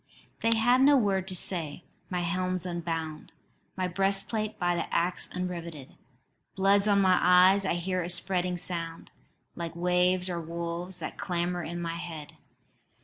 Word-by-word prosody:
"They 230 Hz, 0 st, +2 dB
have 245 Hz, +3 st, +3 dB
no 280 Hz, +1 st, +6 dB
word 195 Hz, -5 st, 0 dB
to 190 Hz, -, -4 dB
say: 170 Hz, -3 st, +1 dB, 0.3 s
my 180 Hz, -1 st, -2 dB
helm's 185 Hz, +1 st, -1 dB
unbound, 165 Hz, -3 st, -5 dB, 0.4 s
My 185 Hz, -1 st, 0 dB
breastplate 195 Hz, +4 st, +1 dB
by 175 Hz, 0 st, 0 dB
the -, -, -4 dB
axe 175 Hz, +1 st, -1 dB
unriveted: 170 Hz, -6 st, -6 dB, 0.6 s
Blood's 200 Hz, +1 st, +3 dB
on 200 Hz, -1 st, +4 dB
my 185 Hz, -1 st, +4 dB
eyes; 185 Hz, +2 st, +5 dB
I 190 Hz, -, 0 dB
hear 185 Hz, +1 st, -2 dB
a 170 Hz, -, -4 dB
spreading 180 Hz, 0 st, +2 dB
sound, 170 Hz, -2 st, -4 dB, 0.4 s
Like 170 Hz, -1 st, -6 dB
waves 180 Hz, +1 st, +1 dB
or 175 Hz, -2 st, -3 dB
wolves 170 Hz, +2 st, -5 dB
that -, -, -6 dB
clamour 175 Hz, -1 st, -2 dB
in 170 Hz, +1 st, -5 dB
my 170 Hz, -1 st, -4 dB
head. 165 Hz, -4 st, -8 dB
180 Hz, 150 wpm, -28 LUFS, 170-190 Hz, 0.6 s, no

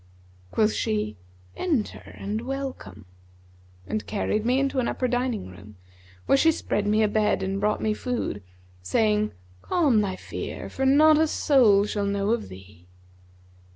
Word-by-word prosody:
Quoth 215 Hz, -1 st, +2 dB
she, 105 Hz, 0 st, -1 dB, 0.4 s
'Enter 295 Hz, -, -2 dB
and 210 Hz, +3 st, -3 dB
welcome;' 265 Hz, -, -6 dB, 0.8 s
and 215 Hz, -, -4 dB
carried 210 Hz, 0 st, -1 dB
me 250 Hz, +3 st, +2 dB
into 275 Hz, -1 st, 0 dB
an 245 Hz, -, 0 dB
upper 255 Hz, -, -1 dB
dining 245 Hz, -, -1 dB
room, 100 Hz, +4 st, -14 dB, 0.5 s
where 275 Hz, -, +4 dB
she 325 Hz, -, +5 dB
spread 205 Hz, -9 st, -2 dB
me 215 Hz, +1 st, +3 dB
a -, -, +4 dB
bed 210 Hz, -2 st, +1 dB
and 195 Hz, +1 st, -2 dB
brought 210 Hz, +1 st, 0 dB
me 215 Hz, -, +1 dB
food, 235 Hz, -, -3 dB, 0.4 s
saying 210 Hz, -, +1 dB, 0.3 s
'Calm 285 Hz, -12 st, +2 dB
thy 190 Hz, -2 st, -2 dB
fear, -, -, -7 dB
for 265 Hz, 0 st, -1 dB
not 305 Hz, +3 st, +6 dB
a 320 Hz, -, +3 dB
soul 230 Hz, -10 st, +4 dB
shall 205 Hz, -1 st, -2 dB
know 200 Hz, +1 st, 0 dB
of 230 Hz, -1 st, -1 dB
thee.' 95 Hz, -1 st, -14 dB
215 Hz, 155 wpm, -25 LUFS, 200-260 Hz, 0.8 s, not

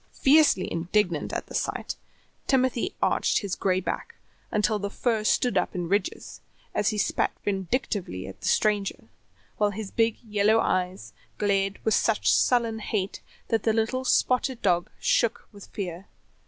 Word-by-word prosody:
Fiercely 285 Hz, -9 st, +5 dB
indignant 170 Hz, -1 st, 0 dB
at -, -, -3 dB
the -, -, -12 dB
sight, -, -, -2 dB, 0.5 s
Timothy 260 Hz, +4 st, +1 dB
arched -, -, +2 dB
his 200 Hz, -3 st, -4 dB
gray 185 Hz, -1 st, +1 dB
back 465 Hz, -, -4 dB, 0.3 s
until 210 Hz, 0 st, +1 dB
the 200 Hz, 0 st, -3 dB
fur 225 Hz, 0 st, 0 dB
stood 245 Hz, +3 st, +2 dB
up -, -, -3 dB
in 175 Hz, -1 st, -2 dB
ridges, 200 Hz, +4 st, -2 dB, 0.3 s
as 210 Hz, -, +1 dB
he 215 Hz, -, -2 dB
spat -, -, +1 dB
vindictively 195 Hz, -, -2 dB
at 95 Hz, -, -10 dB
the -, -, -4 dB
stranger, 205 Hz, -2 st, +1 dB, 0.5 s
while 210 Hz, -1 st, +3 dB
his 205 Hz, 0 st, -6 dB
big 225 Hz, -1 st, +1 dB
yellow 210 Hz, 0 st, +3 dB
eyes 180 Hz, -, -1 dB, 0.2 s
glared 195 Hz, -1 st, +1 dB
with 220 Hz, -, +3 dB
such 225 Hz, -2 st, +3 dB
sullen 230 Hz, -3 st, +2 dB
hate 200 Hz, -2 st, -3 dB, 0.3 s
that 225 Hz, -2 st, +2 dB
the 220 Hz, -, +1 dB
little 230 Hz, +4 st, 0 dB
spotted 255 Hz, -1 st, +1 dB
dog 175 Hz, -3 st, +2 dB
shook 235 Hz, 0 st, +1 dB
with 200 Hz, -2 st, -13 dB
fear. 185 Hz, -1 st, -6 dB
210 Hz, 155 wpm, -26 LUFS, 190-230 Hz, 0.5 s, Fiercely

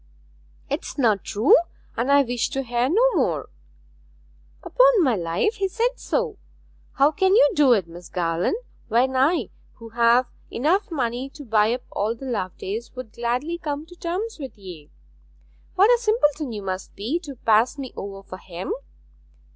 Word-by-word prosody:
'It 285 Hz, +3 st, -2 dB
is -, -, -8 dB
not 220 Hz, -8 st, +2 dB
true, 215 Hz, +7 st, +4 dB, 0.4 s
and 240 Hz, +4 st, 0 dB
I 280 Hz, 0 st, +6 dB
wish 245 Hz, -2 st, -1 dB
to 270 Hz, -, -2 dB
hear 240 Hz, +1 st, 0 dB
no 485 Hz, +9 st, +3 dB
more.' -, -, 0 dB, 1.1 s
'Upon -, -, +4 dB
my 255 Hz, -6 st, +3 dB
life, 175 Hz, -, -1 dB
he 390 Hz, -, 0 dB
said 480 Hz, +6 st, -1 dB
so! 480 Hz, -4 st, -2 dB, 0.5 s
How 280 Hz, +2 st, +4 dB
can 380 Hz, +3 st, +2 dB
you 290 Hz, -9 st, +6 dB
do 280 Hz, -4 st, +5 dB
it, 195 Hz, -7 st, 0 dB
Miss 175 Hz, +1 st, -12 dB
Garland, 170 Hz, -, 0 dB, 0.3 s
when 250 Hz, +3 st, +2 dB
I, 270 Hz, -, +2 dB, 0.2 s
who 230 Hz, 0 st, -12 dB
have 235 Hz, +2 st, +4 dB, 0.2 s
enough 325 Hz, -, +1 dB
money 255 Hz, -4 st, -2 dB
to 290 Hz, +1 st, -12 dB
buy 220 Hz, -1 st, +3 dB
up 245 Hz, +1 st, -3 dB
all 215 Hz, +3 st, -1 dB
the 270 Hz, -, -10 dB
Lovedays, 215 Hz, 0 st, -4 dB
would 255 Hz, -4 st, -8 dB
gladly 250 Hz, +9 st, -2 dB
come 295 Hz, -1 st, -4 dB
to 355 Hz, +2 st, -15 dB
terms 360 Hz, +5 st, -4 dB
with 265 Hz, -7 st, -8 dB
ye? 175 Hz, -7 st, -11 dB, 0.9 s
What 400 Hz, +5 st, +5 dB
a 480 Hz, -1 st, +3 dB
simpleton 305 Hz, -, +1 dB
you 210 Hz, -2 st, -6 dB
must 185 Hz, 0 st, -5 dB
be, 245 Hz, +12 st, -2 dB
to 290 Hz, -5 st, -9 dB
pass 225 Hz, +3 st, +2 dB
me 265 Hz, -3 st, -7 dB
over 195 Hz, 0 st, -7 dB
for 185 Hz, -, -9 dB
him! 185 Hz, -, -5 dB
255 Hz, 170 wpm, -23 LUFS, 215-330 Hz, 1.1 s, I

